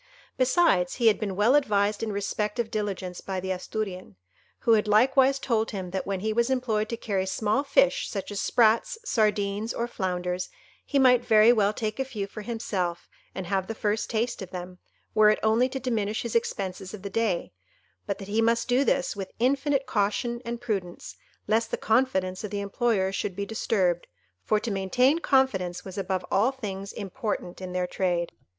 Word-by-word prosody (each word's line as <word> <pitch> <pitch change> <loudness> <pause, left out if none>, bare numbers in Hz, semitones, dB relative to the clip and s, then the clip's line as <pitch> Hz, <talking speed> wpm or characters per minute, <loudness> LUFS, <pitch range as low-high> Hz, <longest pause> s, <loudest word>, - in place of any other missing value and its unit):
Besides, 255 - +3
he 240 - -1
had 210 - +1
been 200 -3 -3
well 210 +6 +4
advised 210 -7 +2
in 225 -1 -2
respect 205 +1 -2
of 235 -2 -2
diligence 195 -4 -3
by 190 -1 -3
the 190 +1 -3
Asturian, 185 - -4 0.5
who 230 - +2
had 215 -1 +3
likewise 265 +5 +4
told 230 -5 0
him 190 -4 -5
that 190 0 -3
when 195 -2 -2
he 215 +1 0
was 235 +2 +2
employed 230 -5 0
to 230 - -3
carry 195 -4 -2
small 215 +7 0
fish, - - +2
such 200 -1 -5
as 200 - -2
sprats, 235 - +3
sardines, 210 - 0
or 235 - -1
flounders, 180 -4 -2 0.3
he 285 - -1
might 250 -2 +5
very 220 +2 +6
well 205 -3 +3
take 215 +2 -4
a - - +2
few 230 -7 -4
for 205 +2 -9
himself 195 -6 -3 0.3
and 190 - -4
have 190 0 -1
the 225 - -4
first 210 0 -1
taste 235 0 -1
of 190 - -6
them, 180 0 -8 0.3
were 215 -1 +6
it 215 - +3
only 225 +4 +3
to 265 0 -4
diminish 220 -5 -1
his 235 - -4
expenses 195 -4 -2
of 195 - -13
the 200 - -4
day, 205 - -1 0.5
but - - -2
that 195 - -9
he 215 +2 +1
must 230 +1 +2
do 255 +2 +3
this 270 -2 +1
with 195 -2 -5
infinite 275 +3 +1
caution 235 +3 -1
and 235 0 -4
prudence, 195 -7 -4 0.3
lest 225 +1 +2
the - - -2
confidence 190 -6 +1
of 210 - -4
the 205 - -3
employers 200 -2 0
should 190 -1 -3
be 200 +1 -3
disturbed; 190 -5 0 0.4
for 215 - +2
to 225 +1 -4
maintain 250 - +2
confidence 210 - +1
was 190 -2 -8
above 190 -1 -2
all 210 +6 +4
things 200 -7 -6
important 205 -3 -4
in 185 -1 -5
their 180 0 0
trade. 175 -2 -1
210 Hz, 190 wpm, -27 LUFS, 190-235 Hz, 0.5 s, very